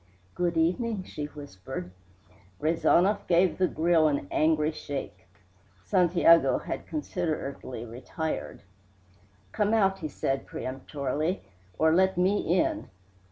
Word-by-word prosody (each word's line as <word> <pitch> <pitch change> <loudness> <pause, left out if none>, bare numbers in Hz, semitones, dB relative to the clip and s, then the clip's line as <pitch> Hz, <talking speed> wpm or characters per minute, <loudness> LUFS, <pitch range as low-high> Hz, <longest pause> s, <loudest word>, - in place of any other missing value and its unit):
"Good 175 -2 -1
evening," 190 +5 +1
she 150 -5 -6
whispered. 130 -9 -8 0.7
Rezanov 170 +6 +2
gave 175 +1 +3
the 185 - +4
grill 165 -1 +3
an 140 -10 -1
angry 155 0 +2
shake. 135 - -7 0.6
(Santiago 170 - +4
had - - -6
considerately 155 - -4
retired.) 130 +7 -5 0.9
"Come 210 +1 +1
out," 195 -3 +2
he 155 - -3
said 135 -1 -2
peremptorily, 140 +6 -3 0.3
"or 160 0 +4
let 190 +1 +3
me 190 +3 +3
in." 175 +2 0
160 Hz, 110 wpm, -28 LUFS, 145-185 Hz, 0.9 s, the